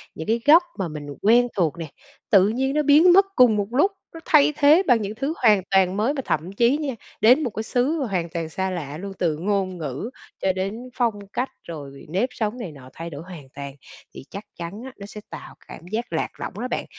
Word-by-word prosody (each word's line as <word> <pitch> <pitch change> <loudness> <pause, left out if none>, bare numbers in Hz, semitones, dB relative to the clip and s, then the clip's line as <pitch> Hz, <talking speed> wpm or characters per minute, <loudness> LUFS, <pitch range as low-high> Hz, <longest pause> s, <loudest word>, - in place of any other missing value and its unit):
những 160 - -7
cái 230 +1 +1
góc 330 +4 +7 0.2
mà 190 - -1
mình 150 -2 -7
quen 240 +4 +5
thuộc 170 -3 0
nè, 165 - -5 0.4
tự 195 -4 +6
nhiên 265 +5 -1
nó 300 0 +1
biến 310 +5 +6
mất 390 +1 +6
cùng 245 -4 +6
một 205 -1 -1
lúc, 295 +11 +3 0.2
nó 330 - -8
thay 300 -1 +5
thế 305 +5 +6
bằng 240 -4 +4
những 205 +1 -4
thứ 275 +6 -2
hoàn 215 -5 +4
toàn 190 0 +3
mới 225 +7 +1
mà 280 - -3
thậm 160 +5 -2
chí 235 +6 +3
nha, 285 -5 -3 0.3
đến 250 +8 +6
một 250 - -1
cái 220 0 -5
xứ 250 +7 0
mà 260 - -1
hoàn 175 -5 -2
toàn 165 -1 -4
xa 190 +4 -2
lạ 155 -5 -5
luôn 195 +3 -7
từ 160 -4 0
ngôn 190 0 -1
ngữ 150 - -5 0.3
cho 190 - +2
đến 205 +7 -4
phong 235 -3 +1 0.2
cách 255 +2 -1
rồi 140 -4 -9
nếp 200 +9 0
sống 220 0 -3
này 210 -9 -6
nọ 135 -3 -13
thay 165 +1 -7
đổi 145 -1 -8
hoàn 170 -7 -11
toàn 140 -1 -7 0.4
thì - - -11
chắc 200 +2 -7
chắn 175 +6 -7
á, 265 - -8
nó 200 - -9
sẽ 210 +1 -10
tạo - - -10
cảm 170 - -11
giác 230 +3 -3
lạc - - -1
lõng - - -5
đó 250 - -2
bạn. - - -3
210 Hz, 240 wpm, -23 LUFS, 170-250 Hz, 0.4 s, góc